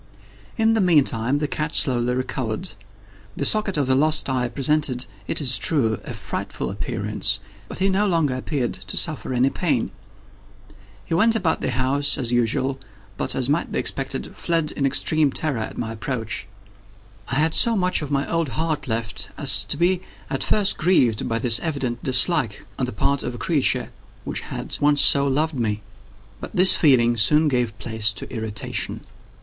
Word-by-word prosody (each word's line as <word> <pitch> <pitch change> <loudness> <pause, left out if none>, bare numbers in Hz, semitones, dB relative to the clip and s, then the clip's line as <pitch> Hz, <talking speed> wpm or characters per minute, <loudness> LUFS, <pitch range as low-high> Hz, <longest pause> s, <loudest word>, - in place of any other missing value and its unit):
In 225 0 +3
the 220 - +2
meantime 140 -7 +2
the 150 0 -1
cat 150 +1 -3
slowly 125 -3 +1
recovered. 130 - -3 0.7
The 140 - -1
socket 215 -2 +3
of 145 - +1
the 130 - +2
lost 155 +3 +3
eye 125 -2 0
presented, 135 -1 +1 0.2
it - - 0
is 130 -7 +1
true, 115 - +1
a - - -7
frightful - - -5
appearance, 100 +2 -2 0.3
but - - -8
he 190 - +1
no 195 +2 +2
longer 165 -7 +1
appeared 130 0 -2
to 95 0 -5
suffer 155 -5 -1
any 130 +2 +2
pain. 145 -10 -1 1.1
He - - -4
went 225 +7 +4
about 190 -7 0
the - - -1
house 135 +3 0
as 120 -3 -2
usual, 125 +3 0 0.4
but, - - -3
as 130 -2 0
might 150 +4 0
be - - -2
expected, 135 -1 -4
fled 165 -3 0
in 140 - 0
extreme 150 +2 +2
terror 145 -5 -1
at 110 - -5
my 110 -1 -3
approach. 115 0 -4 0.8
I 125 - -3
had 155 +3 +2
so 230 +5 +4
much 185 -4 +1
of 150 - -5
my 140 -1 0
old 165 -3 -1
heart 160 0 -2
left, 115 -2 -3
as 95 0 +2
to - - -3
be 180 +1 +2 0.3
at - - -1
first 205 -2 +1
grieved 125 - +2
by 115 - 0
this 115 0 +2
evident 135 -7 -3
dislike 130 - +3
on 130 - 0
the - - -4
part 140 +6 0
of 125 - -4
a - - -7
creature 140 +4 0 0.3
which - - -4
had - - -6
once 145 0 +3
so 140 0 +5
loved 155 +4 +1
me. 105 -3 -2 0.6
But - - -8
this 185 +1 +7
feeling 120 -6 +4
soon 150 +8 +4
gave 120 -5 -1
place 110 -2 0
to 95 - -7
irritation. 110 -3 -3
135 Hz, 175 wpm, -22 LUFS, 120-155 Hz, 1.1 s, this